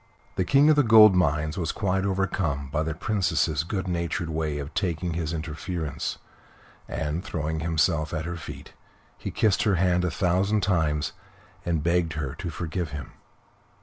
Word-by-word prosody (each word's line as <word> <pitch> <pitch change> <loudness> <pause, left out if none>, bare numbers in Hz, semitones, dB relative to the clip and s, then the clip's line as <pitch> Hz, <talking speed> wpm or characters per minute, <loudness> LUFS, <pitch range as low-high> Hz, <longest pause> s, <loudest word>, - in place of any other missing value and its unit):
The 95 - +1
King 140 +6 +5
of - - +4
the 145 - +5
Gold 110 -4 +8
Mines 80 -1 +1
was 80 -3 -1
quite 95 -2 0
overcome 95 -8 -1
by 75 - 0
the 80 -1 -2
Princess's 80 -5 0
good 95 +2 -3
natured 85 -2 -2
way 80 -2 -1
of 70 +1 -6
taking 85 -3 -1
his 80 -1 -2
interference, 80 -2 -4 0.7
and, 80 +3 -2
throwing 80 -3 -3
himself 80 0 +1
at 80 -1 -3
her 85 0 -4
feet, 85 - -9 0.4
he - - -6
kissed 105 -4 +2
her 105 -3 +2
hand 90 0 +2
a 90 - +1
thousand 95 +4 +1
times 80 -6 +1 0.5
and 80 -3 0
begged 85 -1 +1
her 75 -4 -3
to - - -5
forgive 85 +1 -3
him. 75 -1 -7
85 Hz, 165 wpm, -26 LUFS, 80-95 Hz, 0.7 s, Gold